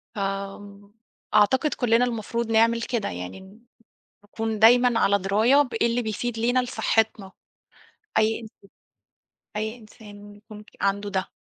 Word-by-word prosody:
ف 210 - -5 1.1
أعتقد 260 +8 +3
كلّنا 240 0 +2
المفروض 230 0 -3
نعمل 230 +1 +3
كده 235 -2 -2
يعني 90 +1 -7
ن 190 +4 -16 0.6
نكون 220 +1 -4
دايمًا 245 +1 +5
على 200 0 +3
دراية 220 +9 +3
بإيه 235 -3 0
اللي 235 +1 0
بيفيد 225 +1 -4
لينا 245 +3 +1
لصحّتنا 220 -5 -1 0.9
أي 220 +1 +1
إنس 220 -2 -11 1.1
أي 220 +2 -3
إنسان 215 -1 -16
إنه 205 0 -13
يكون 210 0 -13
في - - -22
عنده 200 +1 -1
ده. 190 -1 -2
220 Hz, 135 wpm, -24 LUFS, 205-235 Hz, 1.1 s, دايمًا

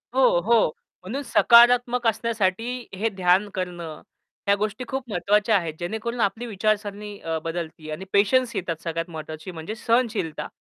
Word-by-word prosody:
हो, 255 -9 +5
हो, 230 0 +3 0.3
म्हणून 255 +10 -4
सकारात्मक 245 0 +5
असण्यासाठी 230 +2 -1
हे 225 +3 0
ध्यान 190 +1 +2
करणं 175 -4 -5 0.5
ह्या 200 - +5
गोष्टी 210 +3 -3
खूप 265 -2 -4
महत्त्वाच्या 210 +3 +2
आहेत. 165 -4 -3
जेणेकरून 220 +7 -4
आपली 225 +4 0
विचारसरणी 210 -1 -2
अ, 165 -1 -3
बदलते. 165 -2 -5
आणि 175 +5 -6
पेशन्स 235 +5 +3
येतात 165 -3 -3
सगळ्यात 165 +1 -3
महत्त्वाची 155 +2 -7
म्हणजे 165 +6 -6
सहनशीलता. 225 -8 0
205 Hz, 140 wpm, -24 LUFS, 175-235 Hz, 0.5 s, हो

